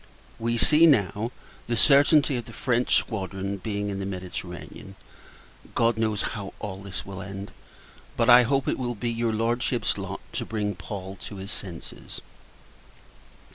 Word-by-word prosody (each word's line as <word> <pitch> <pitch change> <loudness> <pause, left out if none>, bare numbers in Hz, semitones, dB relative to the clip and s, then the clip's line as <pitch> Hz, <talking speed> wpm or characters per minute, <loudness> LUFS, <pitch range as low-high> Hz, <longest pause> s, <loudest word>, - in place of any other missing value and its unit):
We 115 +1 0
see, 155 +7 +6
now, 115 - +2 0.4
the 120 0 0
certainty 145 +1 +5
of 120 -2 -3
the - - -11
French 125 -1 +1
squadron's 100 -2 -2
being 105 -1 -2
in 100 - -4
the 95 - -3
Mediterranean. 90 0 -7 0.8
God 115 -1 +2
knows, 110 -2 +1
how 100 -3 -6
all 95 -2 -6
this 100 -2 -5
will 100 0 -7
end! 100 0 -7 0.7
But 115 - +2
I 125 0 +9
hope 135 +2 +1
it - - 0
will 120 -1 -2
be 120 +3 -2
your 115 0 0
Lordship's 115 +2 0
lot - - -5
to - - -1
bring 105 -2 -2
Paul 95 +2 -7
to 105 - -8
his 95 +1 -6
senses. 90 -4 -7
105 Hz, 155 wpm, -26 LUFS, 100-120 Hz, 0.8 s, I